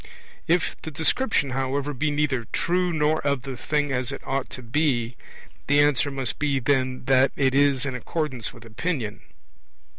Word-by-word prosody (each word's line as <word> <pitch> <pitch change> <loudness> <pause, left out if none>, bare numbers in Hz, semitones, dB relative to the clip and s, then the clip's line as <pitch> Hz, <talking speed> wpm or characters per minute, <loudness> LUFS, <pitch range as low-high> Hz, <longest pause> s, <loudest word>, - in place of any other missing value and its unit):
If 175 +1 +2
the - - -6
description, 160 - +1
however, 135 +2 -1
be 150 +4 0
neither 145 -5 0
true 180 +1 +1
nor 155 -1 +2
of 140 -3 0
the 135 -1 -5
thing 145 +3 -1
as 125 -2 -1
it - - -7
ought 135 0 -2
to 130 - -7
be, 125 -2 0 0.5
the 145 +1 +4
answer 145 0 +3
must 135 -5 -3
be 145 -2 +1
then, 130 -1 0
that 135 0 +4
it 135 -2 +2
is 140 -1 +3
in 135 - -2
accordance 130 -2 -3
with 120 - -14
opinion. 115 -1 -3
140 Hz, 170 wpm, -25 LUFS, 130-150 Hz, 0.5 s, the